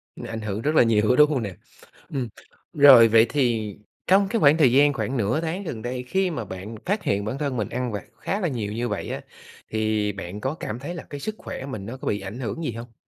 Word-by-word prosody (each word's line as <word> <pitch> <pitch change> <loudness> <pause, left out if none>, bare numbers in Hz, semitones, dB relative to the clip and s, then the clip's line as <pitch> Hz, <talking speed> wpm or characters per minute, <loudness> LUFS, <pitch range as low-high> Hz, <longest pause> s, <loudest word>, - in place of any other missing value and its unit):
Nó - - -8
ảnh 115 0 -5
hưởng 105 0 -3
rất 150 +5 0
là - - +7
nhiều 110 -2 +2
đó, 125 - +5
đúng 150 +2 +6
hông 135 -6 0
nè? 100 -4 -5 0.5
Ừm, 130 -4 -3 0.4
rồi, 135 -5 +9
vậy 115 0 +6
thì 115 -7 0 0.3
trong 195 +1 +5
cái 230 - 0
khoảng 150 -3 +5
thời 140 -7 +5
gian 145 +3 +5
khoảng 135 -1 -2
nửa 115 +7 0
tháng 170 +4 -3
gần 120 - -5
đây, 125 +1 -4
khi 190 +8 0
mà 120 -8 -4
bạn 95 +4 -7
phát 205 +3 -1
hiện 100 0 0
bản 115 +5 -3
thân 140 -3 -2
mình 105 -4 -2
ăn 125 0 -2
vặt 105 -2 -4
khá 200 - -2
là 185 - 0
nhiều 110 -8 -3
như 120 +2 -2
vậy - - -3
á, - - -4 0.5
thì 110 -1 0
bạn 100 0 -7
có 135 +5 -1
cảm 120 -8 -5
thấy 150 +7 -6
là 170 - -7
cái 145 - -6
sức 215 +9 -4
khỏe 130 - -7
mình 110 -8 -6
nó 120 +5 -6
có - - -8
bị 105 - 0
ảnh 100 +5 -7
hưởng 135 +6 -4
gì 150 - -1
hông? 115 +1 -9
125 Hz, 260 wpm, -24 LUFS, 110-145 Hz, 0.5 s, rồi